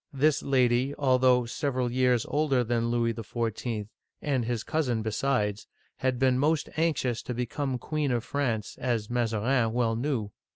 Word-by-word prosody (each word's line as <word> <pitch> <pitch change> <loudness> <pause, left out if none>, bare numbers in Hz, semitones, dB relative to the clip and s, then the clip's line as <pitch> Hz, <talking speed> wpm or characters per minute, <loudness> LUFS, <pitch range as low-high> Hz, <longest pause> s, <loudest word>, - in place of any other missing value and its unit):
This 150 +2 +2
lady, 130 0 +2
al 130 -3 +3
though 125 -1 +4
several 125 0 -1
years 125 -2 +2
older 145 -4 +2
than 115 0 0
Louis 115 -1 +1
XIV., 115 -1 -3 0.3
and 135 -4 0
his 120 -2 -2
cousin 125 -8 0
besides, 110 -2 -1 0.3
had 130 -1 0
been 130 0 +3
most 150 +2 +1
anxious 150 -7 0
to 125 - -5
become 125 +2 -2
Queen 150 +1 -2
of 120 -2 0
France, 120 -7 -2
as 120 -4 -1
Mazarin 115 0 +1
well 115 -2 +1
knew. 115 -4 -2
125 Hz, 155 wpm, -28 LUFS, 115-135 Hz, 0.3 s, though